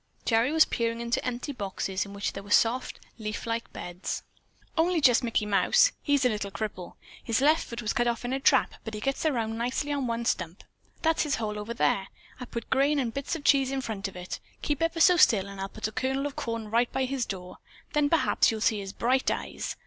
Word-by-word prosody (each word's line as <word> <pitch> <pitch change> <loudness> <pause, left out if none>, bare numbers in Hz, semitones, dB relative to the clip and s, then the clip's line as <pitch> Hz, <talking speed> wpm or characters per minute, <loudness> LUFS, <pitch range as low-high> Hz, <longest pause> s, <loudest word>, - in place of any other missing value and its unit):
Gerry 230 +3 +3
was 320 0 +6
peering 230 0 -1
into 235 0 -1
empty 250 +3 -3
boxes 195 -4 -3
in 200 - -10
which 200 0 -3
there 195 - -6
were 200 - -14
soft, 235 +4 +2 0.2
leaf 215 -1 -4
like 230 0 -3
beds. 180 +1 -5 0.5
"Only 345 +1 +2
just 255 -4 +5
Mickey 230 -3 0
Mouse. 485 - +4
He's 285 -3 +2
a - - +5
little 210 -3 -2
cripple! 195 -3 -5 0.3
His 230 0 +1
left 305 +4 +4
foot 235 0 -6
was 215 - 0
cut 240 - +1
off 235 0 -1
in 245 - -2
a 270 - 0
trap, 270 -1 +3
but 220 -1 -6
he - - -4
gets 275 +7 -1
around 225 -5 -1
nicely 250 +5 -1
on 275 -3 -1
one 235 0 -2
stump. 180 -5 -2 0.4
That's 325 0 +3
his 295 -2 +1
hole 210 -2 -3
over 225 +3 -5
there. 195 -4 +1 0.3
I 250 - -5
put 235 -1 -7
grain 280 +3 +3
and 245 -5 -1
bits 275 +3 -3
of 315 - -7
cheese 275 -2 +4
in 270 0 -2
front 210 -5 -4
of 195 - -11
it. 180 0 -6 0.2
Keep 295 0 -1
ever 330 0 0
so 360 +2 +6
still 210 - +5
and 200 -1 -8
I'll 195 - -3
put 215 - -4
a - - -7
kernel 265 +4 -1
of 290 - -4
corn 230 -2 -4
right 235 +2 +2
by 265 - 0
his 260 -2 -2
door. 180 -2 -7 0.3
Then 295 -1 +3
perhaps 330 - +3
you'll 225 - -2
see 215 -1 +2
his 195 0 -6
bright 255 +2 +1
eyes." - - -3
235 Hz, 235 wpm, -28 LUFS, 210-275 Hz, 0.5 s, was